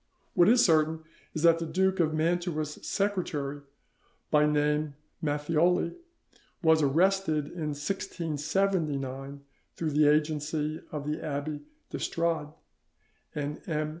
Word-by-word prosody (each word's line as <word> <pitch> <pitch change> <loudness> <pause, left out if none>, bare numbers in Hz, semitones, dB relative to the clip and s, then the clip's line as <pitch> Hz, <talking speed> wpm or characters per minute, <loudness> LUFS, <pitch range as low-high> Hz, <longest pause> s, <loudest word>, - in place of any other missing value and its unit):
What 175 +3 +5
is 240 +1 +6
certain 160 -1 +3 0.3
is 155 - -2
that 165 -1 +6
the 165 - -2
Duke 190 +2 +1
of 160 -2 +3
Mantua's 155 -1 -1
secretary, 155 -8 -2 0.7
by 150 0 +5
name 150 0 +1 0.3
Matthioli, 160 +4 +2 0.7
was 160 -1 +5
arrested 160 +1 +2
in 155 0 -4
1679 150 -5 -2 0.3
through 160 -2 -2
the 150 +1 +4
agency 150 0 +1
of 150 -1 -4 0.2
Abbe 145 0 -3 0.3
d'Estrade 165 -3 -1 0.9
and 145 0 -3
M. 155 -1 0
155 Hz, 105 wpm, -29 LUFS, 150-170 Hz, 0.9 s, is